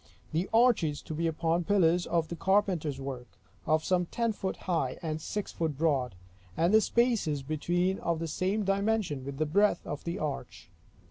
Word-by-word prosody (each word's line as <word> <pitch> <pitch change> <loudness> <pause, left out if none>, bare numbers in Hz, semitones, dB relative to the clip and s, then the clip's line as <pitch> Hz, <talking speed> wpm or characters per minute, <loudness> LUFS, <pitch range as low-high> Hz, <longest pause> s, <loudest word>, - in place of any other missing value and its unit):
The 165 +4 -1
arches 225 -11 +3
to - - -6
be 165 +2 0
upon 165 +2 0
pillars 180 -2 +3
of 165 -1 +1
carpenter's 185 -8 +1
work, 130 -3 -6 0.4
of 155 0 +3
some 180 -2 +1
ten 230 +3 0
foot 190 -2 -4
high, 160 -8 0
and 155 -1 -3
six 210 +5 -4
foot 160 -4 -2
broad; 140 - +1 0.4
and 170 +5 +2
the 220 - +7
spaces 215 - +1
between 175 +6 0
of 170 -1 -1
the 165 +1 -3
same 195 +6 -1
dimension 195 -7 0
with 140 0 -6
the 155 - +1
breadth 200 +7 +2
of 145 - -5
the 170 +2 -3
arch. 150 -5 -5
170 Hz, 175 wpm, -30 LUFS, 155-195 Hz, 0.4 s, the